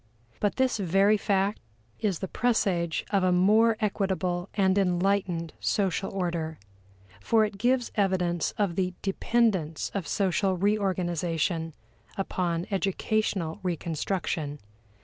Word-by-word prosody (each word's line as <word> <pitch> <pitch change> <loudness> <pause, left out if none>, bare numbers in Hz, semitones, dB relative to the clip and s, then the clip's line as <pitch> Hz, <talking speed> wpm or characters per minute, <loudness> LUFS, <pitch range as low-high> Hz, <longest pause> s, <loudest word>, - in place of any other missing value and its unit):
But 205 - 0
this 260 -2 +1
very 195 +3 +4
fact 200 0 0 0.4
is 200 -5 0
the 190 - -4
presage 185 -8 0
of 200 -2 +2
a 185 - +3
more 215 +5 +4
equitable 190 -4 -1
and 190 -2 +3
enlightened 180 -3 +1
social 195 -1 0
order, 170 -4 -2 0.6
for 220 - +3
it 205 -2 -7
gives 245 +2 +1
evidence 180 -4 +1
of 200 -5 0
the 185 -1 -1
dependence 195 -5 0
of 190 -6 -3
social 190 0 +1
reorganization 175 -5 0 0.4
upon 175 -3 -1
educational 195 -2 -1
reconstruction. 165 -3 -2
190 Hz, 110 wpm, -27 LUFS, 175-205 Hz, 0.6 s, very